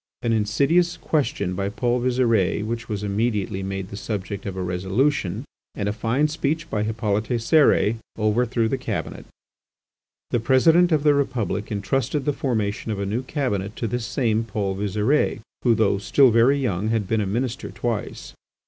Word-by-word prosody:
An 115 - +1
insidious 140 +12 +2
question 115 - -1
by 100 +1 -2
Paul 120 +3 0
Visire 115 -6 +1
which 115 +2 -4
was 105 -2 -3
immediately 105 -2 -1
made 95 0 -4
the - - -7
subject 100 -1 -5
of 95 - -4
a 95 - -2
resolution, 95 +5 0 0.3
and 100 - -2
a 105 - 0
fine 115 +7 +1
speech 155 +1 -2
by 105 - 0
Hippolyte 105 -1 -1
Cérès, 115 -3 +3 0.2
overthrew 115 +2 +1
the 130 +4 -2
Cabinet. 105 -10 -4 1.0
The 120 - +2
President 160 +9 +4
of 155 -2 +2
the 150 -1 +5
Republic 110 -8 -1
entrusted 130 +7 -1
the 145 - +1
formation 110 -5 -2
of 105 - -3
a 100 - -1
new 110 +5 -1
Cabinet 115 -8 -2
to - - -3
this 115 0 -2
same 115 -3 0
Paul 100 -3 -2
Visire, 105 +9 +1 0.2
who, 120 -2 +3
though 100 -3 +2
still 130 +5 +4
very 120 +5 +4
young, 110 -7 -1
had 110 -3 0
been 110 +1 +1
a 100 - -1
Minister 120 +5 -2
twice. 115 -3 -4
110 Hz, 165 wpm, -23 LUFS, 100-130 Hz, 1.0 s, the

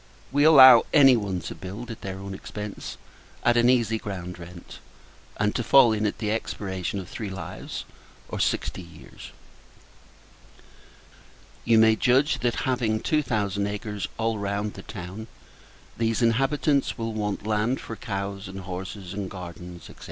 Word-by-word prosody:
We 145 +2 +3
allow 135 -5 +9
any 135 -4 +7
one 100 -5 -2
to - - -6
build 105 +6 -8
at 115 - -9
their 95 -1 -5
own 100 0 -7
expence 105 +1 -7 0.5
at 120 - +4
an 120 0 +4
easy 115 -3 +2
ground 90 -4 -6
rent, 85 0 -11 0.6
and 105 0 +1
to 120 - -1
fall 125 -2 +6
in 105 0 0
at 105 - -3
the 105 -1 -2
expiration 100 -3 -3
of 95 - -8
three 105 +2 -6
lives, 95 -4 -7 0.4
or - - -5
sixty - - -1
years. 80 -5 -13 2.4
You 115 -1 +4
may 110 0 +6
judge 135 +6 +2
that, 120 -1 -1
having 120 -4 0
two 155 +6 +1
thousand 100 -5 -1
acres 105 -1 -4
all 115 -1 -1
round 100 +1 -2
the - - -9
town, 100 +2 -8 0.7
these 115 +1 +1
inhabitants 135 +4 +1
will 115 -1 -3
want 105 -1 -3
land 110 +4 0
for 115 - -7
cows 100 -2 -5
and 95 +1 -7
horses, 95 +1 -7
and 100 -1 -4
gardens, 90 -2 -9
&c. - - -12
105 Hz, 155 wpm, -25 LUFS, 95-115 Hz, 2.4 s, allow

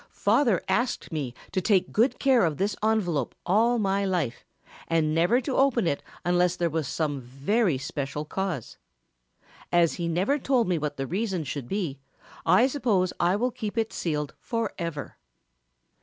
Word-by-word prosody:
"Father 230 - +2
asked 230 +6 0
me 140 -6 -3 0.2
to 185 - 0
take 190 -1 +2
good 235 +5 +2
care 265 -5 +4
of 160 -4 0
this 200 +1 0
envelope 185 - 0
all 225 +6 +3
my 200 -2 +1
life 175 -11 -2 0.4
and 160 -2 +1
never 175 +10 +3
to 265 +1 -3
open 260 -6 +3
it 145 -4 0 0.2
unless 180 0 +2
there 170 -2 0
was 160 -3 -1
some 145 -3 -2
very 140 - 0
special 140 +2 -4
cause. 180 - -4 0.9
As 170 -2 +4
he 170 - 0
never 190 - +1
told 255 -4 +2
me 175 -3 +1
what 150 -1 -3
the 135 - -2
reason 190 - -2
should 140 -3 -5
be 170 -8 -3 0.5
I 185 +9 +6
suppose 225 -10 +1
I 175 +2 +3
will 245 +5 0
keep 225 -2 -5
it 225 0 0
sealed 150 -4 -2
forever." 175 - -4
180 Hz, 160 wpm, -26 LUFS, 155-220 Hz, 0.9 s, I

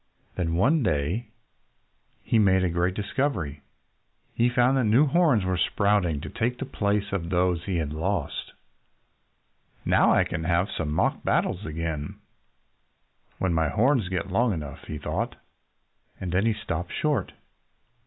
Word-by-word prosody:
Then, 85 -2 -1
one 140 - +3
day, 85 - 0 1.0
he 115 - +2
made 95 -3 +4
a 90 - +1
great 90 +2 0
discovery. 105 - -2 0.7
He 120 +1 +2
found 125 +2 +3
that 130 -3 +2
new 115 +8 +5
horns 150 - +3
were 95 -1 0
sprouting 100 -9 +1
to - - -6
take 120 +2 -1
the 135 - -4
place 105 -3 -1
of 85 -4 -2
those 90 -1 +2
that 85 - -14
he 95 - -1
had 75 -2 -2
lost! 85 0 -3 1.3
"Now - - +4
I - - +4
can 80 -2 -4
have 85 +3 +1
some 80 -3 -3
mock 75 - +1
battles 95 +1 0
again 80 -1 -4 1.2
when 95 -2 0
my 80 -2 +1
horns 120 - +2
get 95 0 -3
long 115 +3 +2
enough," 75 -5 -7
he 75 - -5
thought. - - -3 0.8
And 90 -2 -4
then 95 +5 +2
he 115 - +3
stopped 85 -4 -4
short. 145 -10 -1
95 Hz, 155 wpm, -26 LUFS, 85-115 Hz, 1.3 s, new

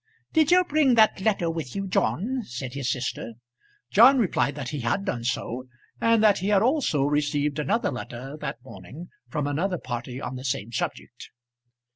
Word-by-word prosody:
"Did 315 -2 +4
you 365 +1 +6
bring 295 -6 +3
that 215 -3 +4
letter 195 -4 +1
with 160 -6 -4
you, 195 - -2
John?" 240 +7 0
said 125 - -6
his 140 -2 -1
sister. 125 -2 -4 0.6
John 270 +1 +7
replied 185 - +1
that 135 -4 -5
he 150 - -4
had 130 +12 -1
done 120 - -2
so, 120 +1 -3 0.4
and 230 -1 +4
that 210 -2 +5
he 190 - -3
had 205 -1 +4
also 250 - +2
received 145 0 0
another 205 +10 0
letter 125 +3 -7
that 135 -4 -5
morning 155 +5 -11 0.2
from 150 -4 -2
another 175 +6 -1
party 120 -2 -5
on 130 -1 -5
the 130 - -8
same 125 -4 -2
subject. - - -5
150 Hz, 175 wpm, -25 LUFS, 130-210 Hz, 0.6 s, John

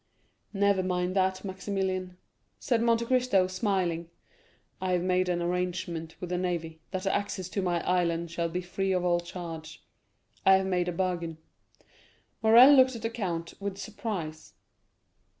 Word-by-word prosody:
"Never 200 -1 +3
mind 180 0 -1
that, 190 0 +1
Maximilian," 190 -1 -3 0.4
said 235 -3 +1
Monte 235 0 +2
Cristo, 250 -6 +3
smiling. 185 -3 -1 0.7
"I 185 -1 0
have 175 -1 +1
made 185 0 +1
an 175 -1 0
agreement 175 -2 -3
with 180 -1 -6
the 180 - 0
navy, 165 -3 -3
that 185 -1 -4
the 195 - 0
access 200 -3 -2
to 195 - -2
my 175 -2 -1
island 170 -2 +1
shall 170 0 -1
be 180 +2 -3
free 190 +2 -1
of 180 -1 0
all 175 -1 +3
charge. 165 -2 -8 0.6
I 190 - +7
have 190 0 +1
made 180 -2 0
a - - 0
bargain." 170 -2 -2 1.0
Morrel 235 +5 +8
looked 260 -2 +5
at 230 - -8
the 225 - -1
count 170 -7 -3
with 200 -1 -3
surprise. 195 -6 -5
185 Hz, 155 wpm, -28 LUFS, 175-195 Hz, 1.0 s, Morrel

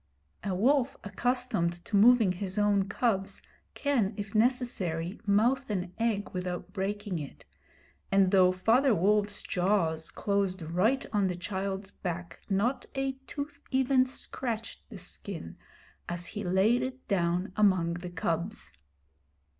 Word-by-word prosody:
A 195 -2 -1
wolf 260 +6 +2
accustomed 205 -6 -1
to 210 - -2
moving 225 -1 +6
his 190 +1 -4
own 200 -2 +2
cubs 195 -3 0 0.3
can, 235 -8 +1
if 205 -1 -5
necessary, 215 -7 0
mouth 240 +6 +3
an 180 -3 -2
egg 220 -3 0
without 180 0 -4
breaking 205 -2 -2
it, 145 -3 -9 0.7
and 195 -1 +4
though 185 -2 +6
Father 225 +7 +3
Wolf's 205 +3 +1
jaws 175 -4 0
closed 195 -3 -1
right 190 - +1
on 205 -2 +3
the 180 - -2
child's 190 +2 -4
back 175 -1 -5
not 210 +7 0
a 270 0 0 0.2
tooth 290 0 -6
even 260 -1 +3
scratched 235 -3 -4
the - - -9
skin, - - -7 0.5
as 175 0 -3
he 205 - -4
laid 195 +7 +3
it 260 0 -5
down 180 0 0
among 185 -5 +3
the 175 +1 -6
cubs. 170 - -2
200 Hz, 130 wpm, -30 LUFS, 180-235 Hz, 0.7 s, moving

